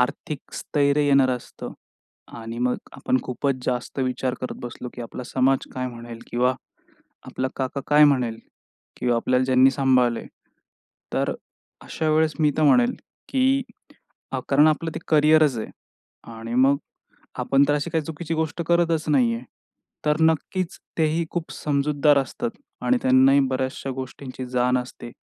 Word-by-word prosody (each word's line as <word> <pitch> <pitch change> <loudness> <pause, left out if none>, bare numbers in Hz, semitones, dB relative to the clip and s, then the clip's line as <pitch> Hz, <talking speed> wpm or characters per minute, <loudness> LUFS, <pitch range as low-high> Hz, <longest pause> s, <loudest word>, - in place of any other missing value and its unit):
आर्थिक 140 +3 -3
स्थैर्य 145 0 +1
येणार 140 -2 +4
असतं. 125 -1 -6 0.7
आणि 115 +1 -7
मग 125 +1 +1 0.2
आपण - - 0
खूपच 135 +2 -1
जास्त 125 +2 -3
विचार 130 0 -1
करत 130 - -4
बसलो, 120 +1 -7
की 120 - -6
आपला 120 +2 -7
समाज 135 +1 +1
काय 130 0 -2
म्हणेल. 120 -1 -8
किंवा 125 +2 +2 0.7
आपला 130 0 -2
काका 135 +1 -2
काय 150 0 +6
म्हणेल 125 -6 +2 0.6
किंवा 120 -1 +1
आपल्याला 125 +2 +1
ज्यांनी 130 +1 +5
सांभाळल 130 -3 +2
आहे, - - -7 0.9
तर - - 0 0.5
अशा 160 - -2
वेळेस 155 0 +3
मी 150 -1 +4
तर 155 - +1
म्हणेल, 245 - +4 0.3
की 270 0 +2 0.9
कारण 145 +2 +5
आपलं 160 +1 0
ते - - -3
करियरच 155 -3 +4
आहे. 110 - -5 0.6
आणि 115 +1 -6
मग 135 +3 +4 0.6
आपण 135 +1 +3
तर 145 - +3
अशी 150 +3 -2
काही 160 -1 0
चुकीची 160 +1 -4
गोष्ट 160 +1 -2
करतच 170 -2 +2
नाही 125 -6 +3
आहे. 115 +2 -6 0.6
तर 150 0 +2
नक्कीच 165 +3 0 0.2
तेही 160 +1 +2
खूप 170 -2 -4
समजूतदार 145 0 +2
असतात, 140 - -2 0.3
आणि 255 - +3
त्यांनाही 130 +2 +5
बऱ्याचशा 130 +1 -3
गोष्टींची 130 0 -7
जाण 125 0 +2
असते, 125 -1 -7
135 Hz, 145 wpm, -24 LUFS, 125-155 Hz, 0.9 s, काय